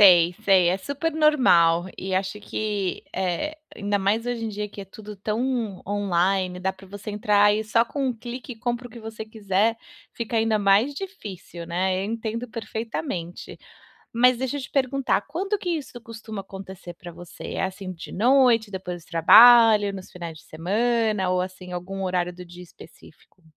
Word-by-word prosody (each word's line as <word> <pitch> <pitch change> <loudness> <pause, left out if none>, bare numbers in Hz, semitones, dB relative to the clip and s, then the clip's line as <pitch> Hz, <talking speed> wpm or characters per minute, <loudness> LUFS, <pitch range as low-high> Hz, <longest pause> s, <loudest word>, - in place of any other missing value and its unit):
Sei, 175 -3 +7
sei, 190 -3 +5
é 185 +2 +1
super 285 - -3
normal. 180 - +4
E 190 0 -3
acho 190 +2 -2
que, 205 -3 -3
eh, 190 - -2 0.2
ainda 205 0 0
mais 205 +4 +1
hoje 240 -2 -2
em - - -2
dia, 210 0 -4
que 200 - -10
é - - -7
tudo 210 +1 -10
tão 220 0 -2
online, 190 -2 0
dá 190 +1 -1
pra 190 0 -16
você 205 +2 -8
entrar 205 0 +3
e 215 - -1
só 230 +2 +2
com 275 +2 -3
um 255 - +1
clique, 245 +1 -7
comprar 240 +1 -3
o - - -23
que 235 - -11
você 220 0 -7
quiser, 215 +1 0 0.4
fica 230 0 -3
ainda 220 -1 +2
mais 205 +8 +3
difícil, 200 - -8
né. 185 +2 0
Eu - - -2
entendo 230 +1 -4
perfeitamente. 220 - -5 0.5
Mas 250 +2 +4
deixa 260 +3 -2
eu - - -4
te 265 - -8
perguntar, 275 0 +1
quando 390 +7 -2
que 360 -2 -3
isso 290 -7 -4
costuma 225 -3 -8
acontecer 190 -2 -10
pra 175 0 -10
você? 175 0 -9
É, - - -1
assim, 190 0 -5
de 170 - -10
noite, 235 -1 +4
depois 180 -3 -6
do - - -24
trabalho, 215 +4 +7
nos 190 -1 -9
finais 170 -3 -7
de - - -18
semana, 210 +3 0
ou 180 0 +1
assim, 185 0 -6
algum 190 +2 -5
horário 180 -1 -1
do 180 +1 -10
dia 180 +1 -12
específico? 170 +1 -17
205 Hz, 180 wpm, -24 LUFS, 185-235 Hz, 0.5 s, Sei